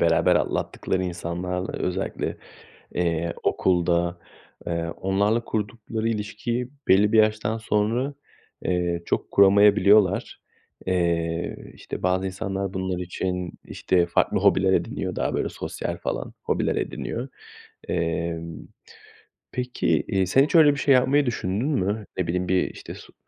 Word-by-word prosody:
beraber - - +4
atlattıkları 95 - -1
insanlarla 90 +1 -3
özellikle, 90 +1 -2 0.6
eee, 85 -1 0
okulda, 85 -1 +1 0.5
eee, 85 -1 -1
onlarla 100 +4 +1
kurdukları 110 +1 -3
ilişkiyi 115 +3 -3 0.2
belli 105 +3 +5
bir 115 - +4
yaştan 110 0 +2
sonra, 115 +5 0 0.5
eee, 90 -1 0
çok - - -2
kuramayabiliyorlar. 100 +1 +5 0.5
Eee, 85 -2 -1
işte, - - -8
bazı 90 +1 +1
insanlar 95 0 -3
bunlar 95 -1 -2
için, 90 0 -3
işte, 90 -2 +1
farklı 85 - +1
hobiler 95 0 +4
ediniyor. - - -1
Daha, - - -1
böyle, - - -1
sosyal - - -5
falan - - -4
hobiler - - 0
ediniyor. 120 +3 -3 0.6
Emm, 85 0 -3 0.8
peki, 125 0 -3 0.2
eee, 95 -3 +1
sen 130 +9 +4
hiç 150 - -1
öyle 155 -3 +8
bir 140 - -5
şey 140 -1 +4
yapmayı 135 +3 +4
düşündün 110 0 -1
mü? 105 -5 -1
Ne 90 -2 -1
bileyim, 90 +1 -1
bir, 95 -1 +2
işte, - - -9
su - - -14
95 Hz, 125 wpm, -24 LUFS, 90-110 Hz, 0.8 s, öyle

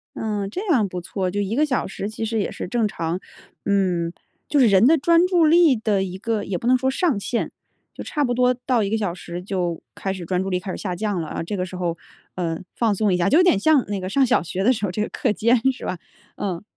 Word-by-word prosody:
嗯， 205 -3 -2
这 380 - -5
样 240 - +3
不 180 - -4
错， 185 +1 -3
就 205 - -2
1 205 +3 -1
个 305 +2 +3
小 255 -4 -1
时 200 +2 -5
其 225 +1 -4
实 225 0 -1
也 - - -1
是 - - -6
正 225 +1 +1
常， 170 -1 -3 0.5
嗯， 180 -4 +1 0.4
就 290 - +3
是 245 - +6
人 200 +2 +5
的 320 +4 +6
专 335 +4 +4
注 355 -3 +3
力 325 -3 +6
的 210 -3 +1
一 185 0 -5
个 220 0 -2
也 185 -2 -3
不 235 - -4
能 255 0 +5
说 265 +1 0
上 295 - +1
限， 235 +3 -2 0.4
就 - - -7
差 295 - -1
不 245 - 0
多 250 +1 +3
到 245 -5 +2
1 200 - -1
个 225 - +1
小 200 -6 -1
时 175 0 -7
就 180 -3 -2
开 195 - -3
始 185 -3 -6
专 180 +1 0
注 195 - -3
力 180 -1 0
开 190 - -8
始 - - -4
下 185 -3 -3
降 205 -3 -2
了 155 - -5
啊。 - - -4
这 205 +5 -4
个 180 -1 -2
时 185 0 -8
候， 170 -2 -2 0.4
呃， 165 -3 -2 0.2
放 225 -3 +2
松 200 -1 +1
一 - - +2
下， 175 - +2
就 300 - +5
有 360 - +6
点 360 - +4
像 285 +4 +3
那 200 -2 -3
个 185 - -4
上 270 +4 +3
小 - - +2
学 185 +3 -3
的 255 +4 +5
时 210 -2 -2
候 180 - -2
这 210 - -2
个 - - 0
课 - - 0
间 230 +4 +3
是 260 - -9
吧？ 185 - -3 0.4
嗯。 185 -2 -4
205 Hz, 285 characters per minute, -22 LUFS, 185-250 Hz, 0.5 s, 是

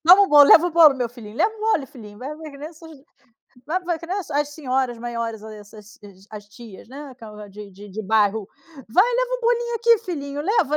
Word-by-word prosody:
toma 370 +3 +8
o 395 - +1
bolo, 290 -1 +7
leva 335 - +7
o 355 - -2
bolo 320 -3 +6
meu 250 -3 -3
filhinho, 225 -2 -13
leva 435 - +1
o 430 - -15
bolo, 435 -11 0
filhinho”. 210 -6 -14
Vai 265 - -7
vai 315 -1 -9
que 280 - -14
nem 300 +2 -7
essas 325 0 -15 0.8
vai 350 +5 -1
vai 340 -2 -2
que 335 - -11
nem 370 - -3
as 380 - -8
as 290 +1 -1
senhoras 260 -5 -2
maiores, 230 -2 -5
essas 210 -1 -13 0.3
as 205 -1 -11
tias, 220 -2 -14
né, 285 +3 -10
aquela 210 -4 -12
de 205 0 -11
de 205 +2 -13
de 220 +3 -6
bairro: 210 0 +1 0.4
“Vai, 365 - +4
leva - - -1
o - - -14
bolinho 475 0 0
aqui, 465 0 +3
filhinho. 285 -5 -5
Leva, 335 - +1
280 Hz, 230 wpm, -22 LUFS, 220-345 Hz, 0.8 s, toma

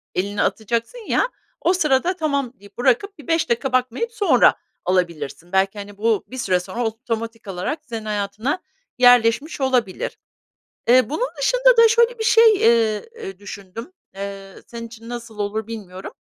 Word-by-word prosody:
elini 200 +3 -1
atacaksın 230 - -1
ya, - - +2 0.3
o 355 - +3
sırada 310 +1 +2
tamam 280 -7 -1
deyip, 200 0 -17
bırakıp, 385 - +1
bir 295 - -14
5 330 -4 +1
dakika 245 +3 0
bakmayıp 255 - 0
sonra 410 -3 +4 0.3
alabilirsin. 170 -2 -2
Belki, 195 +2 +1
hani, 200 0 -9
bu 220 -1 +1
bir 260 - -9
süre 185 -7 +1
sonra 235 +7 -4
otomatik 225 -1 -4
alarak 195 - -3
senin 225 -3 -6
hayatına 210 - -2 0.4
yerleşmiş 245 +4 +4
olabilir. 250 -8 0 0.7
Eee, 255 +1 +5
bunun 465 - -1
dışında - - +4
da, 460 0 +8
şöyle, 470 +1 +3
bir 445 - -1
şey, 450 -1 +6
eee, 230 - +2
eee, 195 - -8
düşündüm. 205 - -9 0.2
Eee, 195 -1 -7
senin 230 -1 -7
için 230 0 -12
nasıl 235 -2 -7
olur 210 +2 -2
bilmiyorum. 195 -5 -8
230 Hz, 155 wpm, -21 LUFS, 205-280 Hz, 0.7 s, da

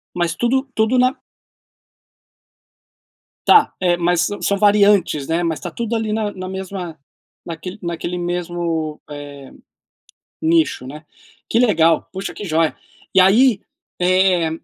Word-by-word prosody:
Mas 175 -2 0
tudo 260 +6 0
tudo 220 +4 +1
na 255 +3 +2 2.3
Tá, 430 - +6
eh, 175 -2 +2
mas 175 0 +1
sã 205 - -2
são 200 - +1
variantes, 200 -8 +3
né? 165 +2 0
Mas 165 -3 -1
está - - -6
tudo 230 0 -3
ali 220 -1 -2
na 215 -1 -1
na 185 -1 -7
mesma, 190 -3 -6 0.5
naquele 180 +3 -7
naquele 170 +1 -4
mesmo, 175 -3 -3
eh, 145 -2 -9 0.9
nicho, 320 - +1
né. 150 +3 -10 0.4
Que 225 - +1
legal, 165 -9 +3
puxa 190 +1 -5
que 210 - -7
joia. 160 -2 0 0.4
E 190 - +6
aí, 215 +3 +4 0.4
eh, 180 -2 +2
180 Hz, 130 wpm, -19 LUFS, 165-210 Hz, 2.3 s, Tá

